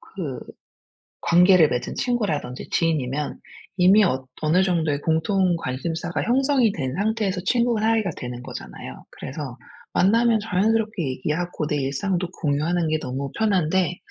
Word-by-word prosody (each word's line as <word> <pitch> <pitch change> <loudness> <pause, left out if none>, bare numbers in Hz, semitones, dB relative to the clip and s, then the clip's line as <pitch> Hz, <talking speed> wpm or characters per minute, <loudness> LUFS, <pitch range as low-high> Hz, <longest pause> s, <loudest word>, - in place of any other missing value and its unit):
그 155 -9 -6 0.8
관계를 180 -1 +6
맺은 125 - -3
친구라든지 200 - -2
지인이면 150 -3 -1 0.4
이미 190 +4 +6
엇 130 -5 -1
어느 165 +5 +3
정도의 160 -6 0
공통 175 +2 +1
관심사가 165 +5 -3
형성이 260 -2 +3
된 130 -8 -3
상태에서 205 -3 -1
친구 235 -1 +2
사이가 220 -4 +1
되는 125 0 -6
거잖아요. - - -9
그래서 135 -2 -7 0.4
만나면 225 +3 +3
자연스럽게 215 -1 0
얘기하고 155 +4 -2
내 150 - 0
일상도 170 +7 -1
공유하는 160 +3 0
게 155 0 +1
너무 135 +2 -4
편한데 185 -4 +1
175 Hz, 325 characters per minute, -23 LUFS, 145-205 Hz, 0.8 s, 관계를